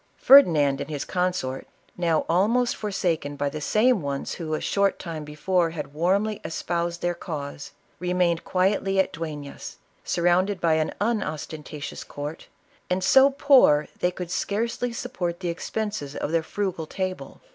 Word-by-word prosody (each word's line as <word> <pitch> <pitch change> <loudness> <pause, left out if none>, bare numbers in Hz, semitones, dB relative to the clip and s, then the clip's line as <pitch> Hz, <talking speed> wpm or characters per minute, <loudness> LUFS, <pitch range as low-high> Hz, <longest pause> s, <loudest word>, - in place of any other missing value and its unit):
Ferdinand 155 - +6
and 140 - -5
his 145 -2 -4
consort, 180 -8 -2 0.3
now 165 -3 +1
almost 230 +8 +2
forsaken 175 -8 -2
by 145 0 -1
the 155 +2 -6
same 215 - +3
ones 140 -1 -3
who 155 -3 -3
a - - -2
short 200 -1 +1
time 160 -3 -6
before 165 +4 0
had 150 -3 -6
warmly 195 +7 +1
espoused 170 +1 -2
their 175 0 +1
cause, 145 -5 -6 0.3
remained 180 -1 +1
quietly 195 +1 +1
at 190 - +1
Duemis, 150 -3 -7 0.3
sur 170 - -2
rounded 185 +3 +3
by 165 -2 +2
an 155 0 +1
unostentatious 155 -8 -3
court, 145 +2 -7 0.4
and 185 +1 0
so 265 +8 +6
poor' 265 - +4
they 180 - +2
could 180 -1 -7
scarcely 230 +6 -1
support 180 -8 -4
the 180 -2 -3
expenses 180 -4 -4
of - - -3
their 165 0 +2
frugal 175 -2 -3
table. 185 +1 -5
175 Hz, 150 wpm, -25 LUFS, 155-195 Hz, 0.4 s, Ferdinand